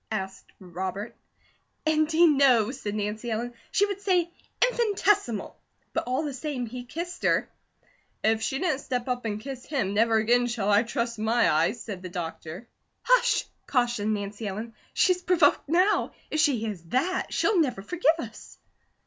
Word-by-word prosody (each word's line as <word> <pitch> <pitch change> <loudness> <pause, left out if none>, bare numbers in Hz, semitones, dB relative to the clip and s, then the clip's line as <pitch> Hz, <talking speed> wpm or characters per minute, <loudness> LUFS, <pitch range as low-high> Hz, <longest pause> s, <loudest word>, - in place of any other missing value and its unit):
asked 190 -3 -5
Robert. 190 +4 -5 0.7
"Indeed, 315 +1 +4
no!" 250 -5 +4
said 210 -6 -5
Nancy 215 +3 -3
Ellen. 235 +2 -2 0.2
"She 405 - +3
would 400 -1 -5
say 355 -4 +1 0.3
'infinitesimal.' 410 - +1 0.4
But - - -1
all 255 +5 0
the 290 -2 -3
same 265 -2 -3
he 245 +2 -7
kissed 345 +7 -6
her." - - +2 0.8
"If 220 0 +2
she 265 - -1
didn't 310 -4 0
step 250 -3 -3
up 245 -1 -2
and 210 -1 -2
kiss 260 +2 -7
him, 225 -10 -1
never 225 +2 +3
again 240 +3 +3
shall 220 -4 -1
I 205 +1 +6
trust 235 -1 -3
my 225 +2 +3
eyes!" 165 +10 +1
said 200 -5 -6
the 185 - -7
doctor. 175 +3 -6 0.4
"Hush!" - - +3 0.2
cautioned 240 -5 +1
Nancy 205 +1 -5
Ellen. 215 +4 -5 0.2
"She's 365 -1 +3
provoked 350 -6 +3
now; 365 +6 +2 0.2
if 310 - 0
she 295 -5 +4
hears 215 -5 -4
that, 270 - 0
she'll 410 -4 +2
never 250 -11 0
forgive 330 - +2
us." 230 -9 -9
245 Hz, 160 wpm, -27 LUFS, 215-315 Hz, 0.8 s, I